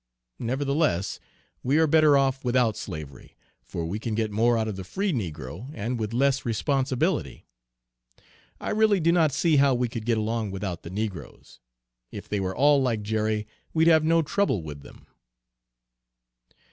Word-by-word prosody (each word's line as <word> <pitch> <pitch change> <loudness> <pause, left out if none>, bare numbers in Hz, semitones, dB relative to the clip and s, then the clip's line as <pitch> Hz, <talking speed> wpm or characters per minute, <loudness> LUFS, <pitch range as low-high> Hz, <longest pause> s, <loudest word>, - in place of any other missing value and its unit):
Nevertheless 135 - 0 0.4
we 135 +4 +1
are 160 - +5
better 155 -2 +5
off 135 -1 +1
without 120 -3 +2
slavery, 75 -5 -8 0.3
for 80 +7 -5
we 95 +6 -3
can 110 -1 -3
get 110 -1 -1
more 115 +3 +2
out 110 -1 0
of 105 - -3
the 95 - -6
free 190 - -2
negro, 90 - -5
and 115 +2 -3
with 110 -1 -3
less 135 +3 +1
responsibility. 130 +2 -1 1.1
I - - -3
really 215 -2 +3
do 170 0 +3
not 165 -4 +3
see 155 +2 +2
how 140 -1 +4
we 125 0 0
could 115 -1 -7
get 115 -2 +2
along 110 0 -1
without 95 -3 -4
the - - -9
negroes. 95 - -6 0.5
If - - -8
they 105 - -2
were 95 -1 -2
all 145 0 +5
like 115 -5 0
Jerry, 110 0 -1 0.3
we'd 160 +1 +4
have 160 -2 +5
no 165 +1 +3
trouble 150 - 0
with 75 -2 -8
them." - - -15
115 Hz, 165 wpm, -26 LUFS, 105-145 Hz, 1.1 s, are